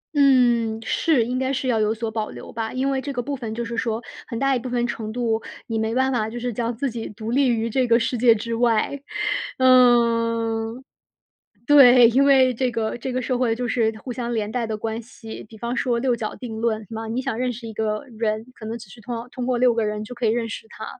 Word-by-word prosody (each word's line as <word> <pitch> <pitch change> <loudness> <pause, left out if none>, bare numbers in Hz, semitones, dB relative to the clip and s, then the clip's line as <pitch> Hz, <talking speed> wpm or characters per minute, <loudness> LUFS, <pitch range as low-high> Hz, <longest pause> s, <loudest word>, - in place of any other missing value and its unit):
嗯， 240 -5 +4
是， 295 -9 +2
应 250 +2 -2
该 260 0 0
是 265 -1 -2
要 235 -3 +2
有 215 0 +2
所 225 0 -3
保 215 -1 -3
留 - - -10
吧。 225 -1 -4
因 265 +2 0
为 265 -1 -1
这 280 +1 -4
个 245 -2 -2
部 280 +2 -3
分 230 -4 -5
就 235 0 -3
是 230 +1 -5
说， 225 -2 -1 0.3
很 230 - -5
大 275 +1 +2
一 245 - 0
部 255 - -6
分 240 -1 0
程 220 -2 -4
度， 225 -2 -1 0.2
你 225 -1 -2
没 220 +1 -1
办 265 +1 +2
法 220 -3 0
就 240 +2 -6
是 245 0 -3
将 235 +1 -2
自 265 +3 -2
己 225 -1 -5
独 220 +2 -6
立 265 +1 +3
于 230 -1 +1
这 250 +2 +1
个 235 +1 +4
世 230 +2 -1
界 230 -1 +5
之 230 +2 -4
外。 235 +3 +1 0.6
嗯 230 -2 +3 0.8
对， 250 -4 +8
因 265 +4 +3
为 265 -2 +5
这 255 +2 0
个 225 -2 -2
这 255 +2 -4
个 255 +1 -1
社 250 0 -1
会 245 -3 +1
就 245 +1 -3
是 225 -3 +1
互 250 - -6
相 240 -1 -3
连 215 -2 -1
带 240 0 -1
的 220 -1 -3
关 225 +1 -3
系， 225 -1 -10
比 220 - -13
方 235 +3 -3
说 245 -3 0
“六 250 -1 +1
角 220 -2 -4
定 230 -4 -7
论” 220 -2 0
嘛， 225 0 -5
你 235 +4 -2
想 265 -4 -3
认 250 0 0
识 235 0 -8
一 220 - -7
个 215 +3 -2
人， 220 0 -1
可 225 - -11
能 230 +1 -4
只 235 -3 -12
需 225 +3 -14
通 240 +2 -5
要 230 +1 -6
通 250 -1 -5
过 250 - +1
6 245 -1 +4
个 230 - 0
人 210 0 -2
就 245 - -8
可 240 0 -2
以 - - +4
认 230 +1 0
识 220 - -7
他， 220 - -8
235 Hz, 270 characters per minute, -23 LUFS, 225-250 Hz, 0.8 s, 对